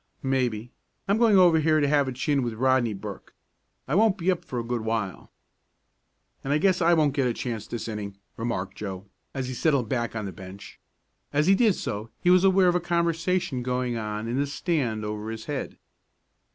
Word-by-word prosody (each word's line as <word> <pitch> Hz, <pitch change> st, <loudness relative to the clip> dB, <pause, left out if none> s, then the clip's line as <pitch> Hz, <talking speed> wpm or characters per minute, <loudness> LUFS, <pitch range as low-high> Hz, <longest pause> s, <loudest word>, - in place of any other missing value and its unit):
"Maybe. 125 Hz, -4 st, -1 dB, 0.4 s
I'm 200 Hz, +3 st, +2 dB
going 225 Hz, -4 st, +5 dB
over 175 Hz, -3 st, +6 dB
here 155 Hz, 0 st, +3 dB
to 145 Hz, -, +2 dB
have 145 Hz, -1 st, +3 dB
a -, -, -2 dB
chin 135 Hz, +3 st, 0 dB
with 120 Hz, -3 st, -3 dB
Rodney 125 Hz, -2 st, +2 dB
Burke. 95 Hz, -, -9 dB, 0.5 s
I 135 Hz, -, -2 dB
won't 210 Hz, +2 st, +4 dB
be 180 Hz, +1 st, +1 dB
up 180 Hz, -, -3 dB
for 125 Hz, -, -6 dB
a 120 Hz, -, -1 dB
good 120 Hz, 0 st, -2 dB
while." 110 Hz, -4 st, -3 dB, 1.1 s
"And 135 Hz, -, -2 dB
I 145 Hz, -, +4 dB
guess 185 Hz, +3 st, +2 dB
I 170 Hz, +1 st, +5 dB
won't 150 Hz, -4 st, +2 dB
get 135 Hz, -3 st, +1 dB
a 120 Hz, -, -1 dB
chance 115 Hz, -4 st, -4 dB
this 120 Hz, -, -5 dB
inning," 105 Hz, -3 st, -5 dB, 0.2 s
remarked 115 Hz, -5 st, -3 dB
Joe, 95 Hz, -2 st, -6 dB, 0.3 s
as 130 Hz, -2 st, -2 dB
he 130 Hz, -, -4 dB
settled 135 Hz, -4 st, +1 dB
back 120 Hz, -3 st, -1 dB
on 110 Hz, -2 st, -3 dB
the 95 Hz, -, -4 dB
bench. 95 Hz, +2 st, -11 dB, 0.5 s
As 150 Hz, +1 st, +2 dB
he 190 Hz, -, +5 dB
did 215 Hz, -1 st, +4 dB
so 105 Hz, +2 st, -4 dB
he 180 Hz, -, +3 dB
was 180 Hz, 0 st, +5 dB
aware 190 Hz, -1 st, +5 dB
of 175 Hz, -, +4 dB
a 180 Hz, -, +2 dB
conversation 170 Hz, -4 st, 0 dB
going 125 Hz, 0 st, -1 dB
on 105 Hz, 0 st, -4 dB
in 120 Hz, +3 st, -1 dB
the 140 Hz, -, +1 dB
stand 135 Hz, -8 st, -1 dB
over 105 Hz, +1 st, -4 dB
his 110 Hz, 0 st, -6 dB
head. 145 Hz, -2 st, -4 dB
130 Hz, 205 wpm, -26 LUFS, 110-165 Hz, 1.1 s, over